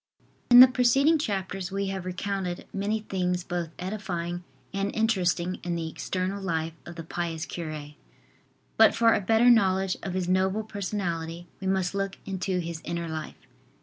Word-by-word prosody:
IN 245 0 +11
the 255 - +12
preceding 270 +5 +3
chapters 195 - -3
we 195 0 -1
have 190 -2 -4
recounted 185 -1 -3
many 210 +2 -1
things 180 -3 -1
both 175 -2 -3
edifying 180 -3 -4 0.3
and 195 0 -1
interesting 185 -5 +1
in 175 -1 -2
the 165 -1 -3
external 185 +4 -3
life 165 -3 -2
of 170 - -8
the 165 - -6
pious 165 0 -3
cure. 155 -4 -6 0.9
But 220 0 +6
for 230 0 +5
a - - +1
better 225 +5 +5
knowledge 190 -4 +3
of 185 -1 -4
his 185 -2 -1
noble 190 +3 +1
personality 175 -5 -4
we 190 - -4
must 190 -1 +1
look 195 -1 -2
into 190 -1 -2
his 170 -2 -4
inner 170 0 -3
life. 160 -1 -6
185 Hz, 160 wpm, -27 LUFS, 175-200 Hz, 0.9 s, the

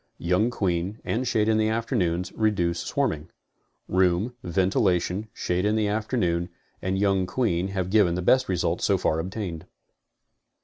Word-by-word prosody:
Young 90 +7 +1
queen, 95 -1 -1
and 125 +3 -1
shade 110 -2 +2
in 110 0 +3
the 110 - +2
afternoons, 100 -7 -1
reduce 90 -6 +1
swarming. 80 +1 -2 0.6
Room, 95 +5 +2
ventilation, 95 +1 +1
shade 90 -1 -1
in 105 +1 +2
the 110 -1 +1
afternoon, 100 -5 0 0.3
and 95 +1 -1
young 95 -2 +2
queen 95 -6 0
have 95 -2 -3
given 100 -5 +4
the 90 - -2
best 130 +5 +3
results 85 -2 0
so 100 - +3
far 80 -3 0
obtained. 90 -2 -5
95 Hz, 145 wpm, -25 LUFS, 90-110 Hz, 0.6 s, given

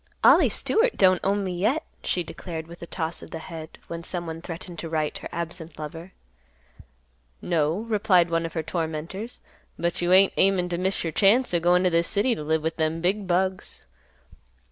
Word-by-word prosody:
"Ollie - - +7
Stewart 465 +2 +1
don't 185 -2 +5
own 200 +1 +1
me 185 -2 -3
yet," 220 - +1 0.2
she 180 - 0
declared 165 -1 -7
with 170 +1 -13
a 170 - -7
toss 165 -1 -3
of - - -11
the - - -6
head, 160 -1 -9
when 170 0 -5
someone 170 -2 -4
threatened 170 0 -7
to 165 - -4
write 155 -2 -1
her - - -7
absent 170 -2 -5
lover. 160 +4 -7 1.3
"No," 165 +2 0
replied 200 -6 +2
one 165 0 +1
of 165 - -5
her 160 - -2
tormentors, 165 +7 -4 0.4
"but 170 0 -1
you 175 0 +1
ain't 190 +1 +6
aimin' 190 -2 +3
to 175 -1 -2
miss 190 +2 +1
your 165 -2 -3
chance 215 - +4
o' 170 - +3
goin' 175 +2 +3
t' 180 - +3
th' 170 0 +3
city 210 +8 +1
t' 155 - -5
live 155 +1 0
with 160 - -2
them 160 0 0
big 190 +3 0
bugs." 185 +2 -1
175 Hz, 190 wpm, -25 LUFS, 165-190 Hz, 1.3 s, Ollie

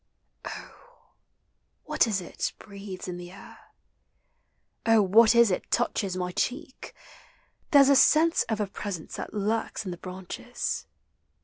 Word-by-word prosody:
Oh, - - -11 0.7
what 305 -5 +2
is 200 -4 -1
it 175 - -4
breathes 200 -3 -9
in 180 -1 -5
the 175 0 -9
air? 195 - -13 1.2
Oh, 225 -2 +4
what 220 +4 +5
is 235 -3 +6
it 180 - -3
touches 200 -5 0
my 180 0 -2
cheek? 260 - -4 0.7
There's 280 -3 +7
a 280 - +6
sense 325 +4 +5
of 220 -2 -1
a 210 - +1
presence 195 -3 -6
thai - - -4
lurks 215 +1 -2
in 185 - -4
the 175 - -6
branches. 185 +7 -5
210 Hz, 135 wpm, -27 LUFS, 185-240 Hz, 1.2 s, There's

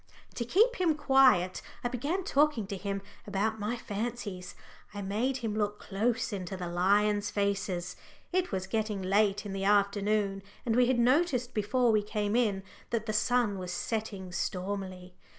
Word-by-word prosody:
To 235 - -2
keep 440 - +3
him 340 -4 +2
quiet 265 -11 +4 0.2
I - - +1
began 285 +10 -2
talking 290 - +2
to 200 - -5
him 195 0 -4 0.2
about 210 +2 -1
my 215 +4 -2
fancies. 205 -4 -5 0.4
I 205 - -4
made 225 +7 0
him 215 - -1
look 210 -1 -1
close 225 +3 -1
into 190 -1 -4
the 180 - -4
lions' 205 +4 +2
faces 200 -3 -1 0.4
it 365 0 +1
was 190 -2 -2
getting 210 -1 -2
late 205 +2 +2
in 200 - -5
the 195 0 -3
afternoon, 200 0 +2 0.2
and 225 -2 +1
we 250 0 +5
had 255 -1 +2
noticed 250 0 +2
before 235 +3 +2
we 215 -1 +3
came 210 0 -2
in 210 -6 +1 0.3
that 230 -2 -1
the 215 - -2
sun 215 -2 +2
was 180 -1 -5
setting 200 -3 -3
stormily. 185 0 -4
210 Hz, 165 wpm, -30 LUFS, 195-240 Hz, 0.4 s, we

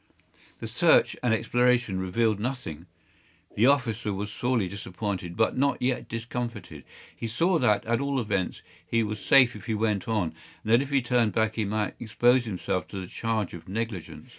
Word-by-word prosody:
The - - -7
search - - +4
and 125 - +1
exploration 120 -3 +2
revealed 105 +3 +1
nothing. 105 - -5 0.7
The 115 +5 +4
officer 120 -6 +1
was 100 +1 -4
sorely 120 -3 0
disappointed, 95 -2 -5
but 110 - +2
not 140 +1 +1
yet 125 0 -1
discomfited. 115 -1 -5 0.3
He 115 - -4
saw 165 - +1
that, 105 -6 +2
at 115 +3 +1
all 140 -1 0
events, 95 -6 -2 0.2
he 115 -1 +1
was 105 -1 -4
safe 130 -4 +5
if 105 +3 -10
he 110 - 0
went 105 0 0
on, 105 -8 0 0.3
and 110 - +1
that 120 - +6
if 140 - -4
he 140 -3 +2
turned 120 -4 +2
back 110 +1 +1
he 110 -2 -1
might 105 +1 -1
expose 120 +2 +3
himself 90 -3 -2
to 100 - -6
the 95 - -5
charge 110 +1 -2
of 85 +1 -10
negligence. 110 -3 -5
115 Hz, 180 wpm, -27 LUFS, 105-125 Hz, 0.7 s, that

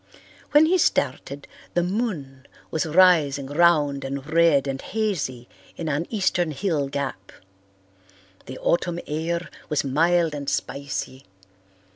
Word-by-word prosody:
When 295 +2 +6
he 365 +3 +2
started, 140 - -1 0.3
the 175 - +3
moon 175 - -3 0.2
was 160 +1 -1
rising 155 -5 +4
round 145 -2 +2
and 135 0 -5
red 160 -3 +4
and 135 -1 -3
hazy 165 - -3 0.3
in 165 - -4
an 150 +3 -1
eastern 185 -5 0
hill 155 -2 -1
gap. 135 -9 -5 1.2
The 130 - -7
autumn 175 0 0
air 170 +3 -2 0.2
was 150 - +1
mild 165 +4 +2
and 140 -1 -4
spicy. 135 -1 -4
155 Hz, 120 wpm, -24 LUFS, 140-175 Hz, 1.2 s, When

